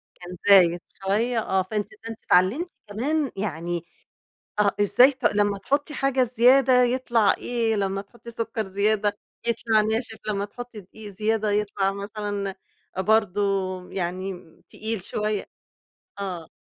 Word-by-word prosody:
كان 180 0 -9
زايد 175 -3 +7 0.3
شوية، 225 +4 +1
آه، 190 -3 +1
فأنتِ 205 +1 -3 0.2
فأنتِ 225 -1 -6
اتعلمتِ 215 - +3 0.2
كمان 275 +7 -1
يعني 170 -3 -3 0.8
آه، 200 -1 +4
إزاي 250 +7 +6
ت 260 -1 -15
لمّا 205 -1 +2
تحطي 285 +8 -1
حاجة 270 -1 +1
زيادة 250 +2 +5
يطلع 240 -3 +2
إيه، 230 -2 0
لمّا 195 0 -1
تحطي 235 +3 -13
سكر 225 -1 -3
زيادة 205 +1 0 0.3
يطلع 225 -2 +2
ناشف، 220 +1 -1
لمّا 200 -1 0
تحطي 240 +1 -9
دقيق 205 +2 -11
زيادة 215 +1 0
يطلع 200 -1 0
مثلًا 200 -1 -4 0.4
برضه 205 0 +2 0.5
يعني 185 +1 -3 0.3
تقيل 220 -3 -4
شوية 210 0 -2 0.8
آه. 180 -5 -5
210 Hz, 125 wpm, -25 LUFS, 195-235 Hz, 0.8 s, زايد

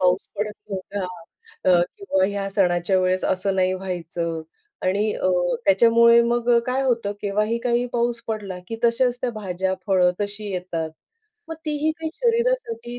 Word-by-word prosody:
पाऊस 180 +1 +3 0.2
पडत 210 +1 -2 0.2
नव्हता, 195 0 -4 0.7
अ, 175 -1 +6 0.2
किंवा 295 - +1
या 200 0 -3
सणाच्या 185 -1 +2
वेळेस 185 0 +1
असं 190 +1 0
नाही 185 -1 +2
व्हायचं 170 -3 -4 0.4
आणि 200 +3 +1
अ, - - 0 0.4
त्याच्यामुळे 235 +4 +6
मग 240 0 +1 0.2
काय 255 +2 0
होतं, 235 -6 0
केव्हाही 210 +3 0
काही 240 0 +1
पाऊस 235 0 0
पडला 205 -4 -4
की 225 - -4
तशाच 245 +1 +2
त्या 250 - 0
भाज्या, 190 -1 -1
फळं 185 -3 +4
तशी 205 0 -4
येतात. 175 -3 -3 0.6
मग 325 - -4
तीही 305 +1 0
काही 320 0 -3
शरीरासाठी 465 - 0
205 Hz, 150 wpm, -23 LUFS, 185-235 Hz, 0.7 s, अ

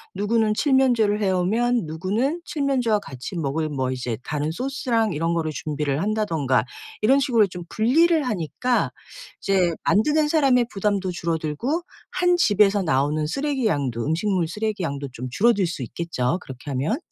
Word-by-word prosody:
누구는 215 +2 +1
칠면조를 240 -5 +2
해 195 - +2
오면 225 +5 +1
누구는 205 - -1
칠면조와 270 -9 0
같이 135 0 -8
먹을 155 0 -1
뭐 130 -3 -2
이제 125 -3 -3
다른 150 +1 -2
소스랑 235 -1 -1
이런 165 +3 0
거를 160 -2 -1
준비를 150 -1 -2
한다든가 165 - 0 0.4
이런 260 +6 +4
식으로 230 -6 +3
좀 180 -1 -8
분리를 315 +9 +3
하니까 240 - -1 0.5
이제 185 -3 +2
만드는 300 +9 +3
사람의 275 -6 +3
부담도 200 -2 -1
줄어들고 170 - -2 0.3
1 355 -1 +2
집에서 205 - +3
나오는 150 -2 +1
쓰레기 275 - -1
양도 130 - -1
음식물 170 +2 0
쓰레기 210 +1 -2
양도 140 -3 -3
좀 130 +1 -6
줄어들 205 - +3
수 165 -5 -5
있겠죠 130 0 -2
그렇게 130 0 -10
하면. 140 - 0
195 Hz, 345 characters per minute, -23 LUFS, 155-240 Hz, 0.5 s, 이런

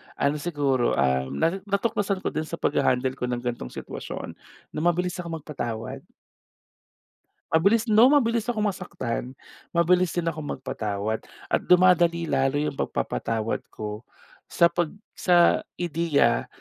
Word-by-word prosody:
ano 145 +2 +1
siguro, 145 -6 0
um, 65 0 +1
nasi 165 - +1
natuklasan 200 -1 0
ko - - -1
din 155 - -3
sa 170 - -5
paghahandle 130 +1 +1
ko 125 - -2
ng 120 -1 -2
ganitong 120 - -4
sitwasyon - - -7 0.3
na - - -4
mabilis 175 +2 +1
akong 165 -3 -5
magpatawad. 120 -7 -5 1.5
Mabilis 200 +8 +4
no, 225 +4 +7
mabilis 235 -5 +2
akong 220 -3 0
masaktan, 170 - -3 0.4
mabilis 180 +1 +3
din 175 - 0
akong 155 -3 -3
magpatawad. 110 -4 -3 0.3
At - - +3
dumadali 175 -2 +5
lalo 135 -3 +1
yung 145 -1 -1
pagpapatawad 110 - -1
ko 105 +2 -7 0.4
sa 170 0 +3
pag 175 -2 0 0.2
sa 175 -1 +4 0.2
ideya 155 -8 +1
160 Hz, 130 wpm, -25 LUFS, 125-180 Hz, 1.5 s, no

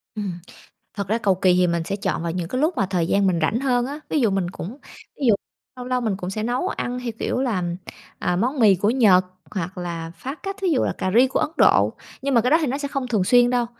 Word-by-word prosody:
Ừm. 205 -3 -3 0.6
Thật 200 -2 -4
ra 220 +4 +1
cầu 200 -5 +2
kỳ 185 0 +3
thì 180 0 +4
mình 170 -1 0
sẽ 195 - -3
chọn 195 -4 -2
vào 170 - -1
những 175 -1 -3
cái 255 +8 -2
lúc 320 +4 +2
mà 195 - +2
thời 175 -3 0
gian 195 +1 +2
mình 175 -3 +1
rảnh 215 +9 +1
hơn 245 -3 +1
á, 285 +3 -6
ví 305 - +1
dụ 235 -5 +3
mình 190 -2 0
cũng 200 - -7 0.4
ví 280 - -1
dụ 220 - +6 0.4
lâu 250 -1 -7
lâu 255 0 0
mình 215 -5 0
cũng 180 -2 -5
sẽ 215 +3 -3
nấu 245 +9 -1
ăn 250 -9 -3
theo 245 -2 -4
kiểu - - -1
là, 225 -9 0 0.6
à, 180 - 0
món 255 +9 0
mì 210 -4 +6
của 200 +4 +1
Nhật, 210 -7 +5 0.3
hoặc 185 -1 -4
là 170 -2 -5
phá 270 +3 -6
cách, 390 +5 -6
thí 385 - 0
dụ 310 -7 +2
là - - 0
cà 185 - -1
ri 255 +2 +6
của 265 - -1
Ấn - - 0
Độ, - - +4 0.3
nhưng 275 0 -1
mà 235 - +5
cái 250 - 0
đó 320 - +7
thì 305 - 0
nó 265 +3 -1
sẽ 285 -1 -3
không 275 -3 -3
thường 215 -6 +1
xuyên 245 +4 +5
đâu. 245 -1 +1
220 Hz, 280 wpm, -22 LUFS, 185-255 Hz, 0.6 s, đó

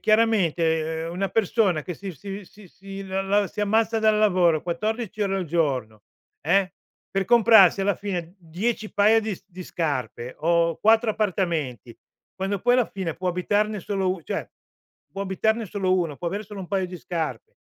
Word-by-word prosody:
chiaramente, 165 -8 +2
ehm, 165 - -5
una 195 +2 -1
persona 200 -6 +1
che 180 - -6
si 195 +1 -7
si 195 +6 -8
si 195 0 -11
l 190 - -11
l 195 +1 +1
si 210 - -6
ammazza 220 +2 +2
dal 215 -1 +3
lavoro, 180 -6 +3
14 215 +4 -2
ore 195 -1 0
al 190 - -2
giorno, 130 -10 -1 0.4
eh, 185 +4 +2 0.4
per 195 0 0
comprarsi 220 -5 +6
alla 200 0 +2
fine 180 -4 -5
10 205 +6 -3
paia 215 +2 +4
di 215 -2 -3
s 190 - -18
di 185 -1 -9
scarpe 130 -8 -3
o 170 +1 +2
4 220 +1 +4
appartamenti, 165 - -2 0.4
quando 195 +1 -2
poi 245 +1 +3
alla 250 -3 +3
fine 185 -5 -4
può 185 +1 -3
abitarne 205 +4 0
solo 190 0 -1
u 185 -2 -3
cioè, - - -4 0.6
può 195 - -4
abitarne 220 +3 0
solo 185 -1 0
1 165 -6 -1
può 175 - -6
avere 200 +4 -4
solo 205 -1 -8
1 180 - -7
paio 190 -2 0
di 180 0 -8
scarpe. 160 -10 -4
190 Hz, 175 wpm, -24 LUFS, 170-210 Hz, 0.6 s, comprarsi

